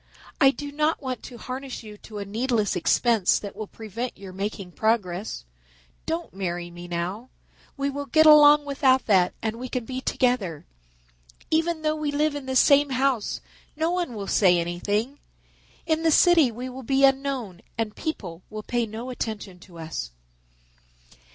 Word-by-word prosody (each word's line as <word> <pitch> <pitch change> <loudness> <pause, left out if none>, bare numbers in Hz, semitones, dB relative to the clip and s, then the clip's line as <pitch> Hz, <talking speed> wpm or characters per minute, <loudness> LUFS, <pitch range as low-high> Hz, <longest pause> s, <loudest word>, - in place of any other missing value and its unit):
"I 275 - +7
do 285 +1 -4
not 305 +2 +1
want 260 -3 -4
to 245 - -9
harness 255 +2 -6
you 210 -1 -10
to 210 +1 -11
a 200 - -4
needless 220 0 0
expense 210 +3 +3
that 200 - -7
will 215 0 -6
prevent 225 +4 -6
your 195 -2 -10
making 195 -1 -4
progress. 205 - -1 0.6
Don't 165 +1 -3
marry 175 -2 -4
me 175 0 -9
now. 180 +8 -4 0.5
We 280 0 -1
will 285 +1 -5
get 315 +4 +4
along 295 -1 +8
without 270 -2 +2
that 185 -4 +3
and 225 +1 -2
we 255 0 -5
can 250 -3 -3
be 260 +1 -5
together. 235 - 0 0.9
Even 325 0 +1
though 310 0 +1
we 305 -1 -2
live 300 +1 +1
in 285 -2 -6
the 260 - -2
same 285 +2 +5
house 260 -3 0 0.3
no 320 +3 0
one 350 -9 -2
will 200 -2 -5
say 185 -3 +4
anything. 205 +10 -2 0.7
In 320 -1 +1
the 325 - +3
city 325 -3 +5
we 245 +3 -6
will 260 +1 -8
be 270 +2 +3
unknown 270 -9 0 0.2
and 225 -2 -2
people 190 - -5
will 215 0 -7
pay 240 0 -1
no 230 +4 -6
attention 210 -6 -5
to 175 -1 -15
us." 160 - -5
240 Hz, 170 wpm, -25 LUFS, 200-280 Hz, 0.9 s, along